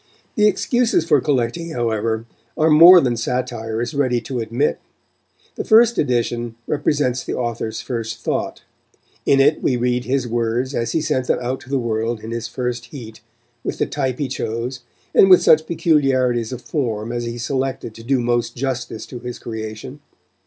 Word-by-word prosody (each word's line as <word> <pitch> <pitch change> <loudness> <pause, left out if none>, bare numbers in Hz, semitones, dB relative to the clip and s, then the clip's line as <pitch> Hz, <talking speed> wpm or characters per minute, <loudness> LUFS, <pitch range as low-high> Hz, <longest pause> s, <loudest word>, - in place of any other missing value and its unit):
The 210 -1 +4
excuses 225 -2 +1
for 145 -4 +3
collecting, 145 +5 -1
however, 115 -1 -1 0.3
are 160 0 +3
more 170 +4 +9
than 125 -4 0
satire 115 -1 -2
is 120 - -5
ready 130 -4 +1
to 125 +2 -4
admit. 115 +6 -1 0.7
The - - -4
first 235 +1 +5
edition 120 -3 -1
represents 145 -3 0
the - - -4
author's 115 -2 -3
first 115 -2 -4
thought; - - -3 0.6
in 135 - +4
it 145 +3 +3
we 125 - +1
read 125 0 0
his 130 -1 0
words 120 +3 -1
as 115 -2 -2
he 160 - +1
sent 145 -4 -1
them - - +2
out 125 +2 -3
to 130 - -15
the 140 - +1
world 115 -1 -2
in 110 +2 -8
his 115 0 -3
first 125 -1 -4
heat, 115 -3 -10 0.4
with - - -3
the - - +1
type 130 -4 -2
he 145 - -2
chose, 125 0 -4 0.3
and 190 - +6
with 185 - +7
such 155 0 +5
peculiarities 130 -8 +1
of 125 -1 -7
form 115 -7 -2
as 120 0 -3
he 120 0 -5
selected 130 -1 -3
to 115 - -12
do 130 +2 +1
most 120 -1 -1
justice 125 -4 -4
to 125 - -9
his 125 0 -6
creation. 110 +4 -7
125 Hz, 175 wpm, -20 LUFS, 115-140 Hz, 0.7 s, more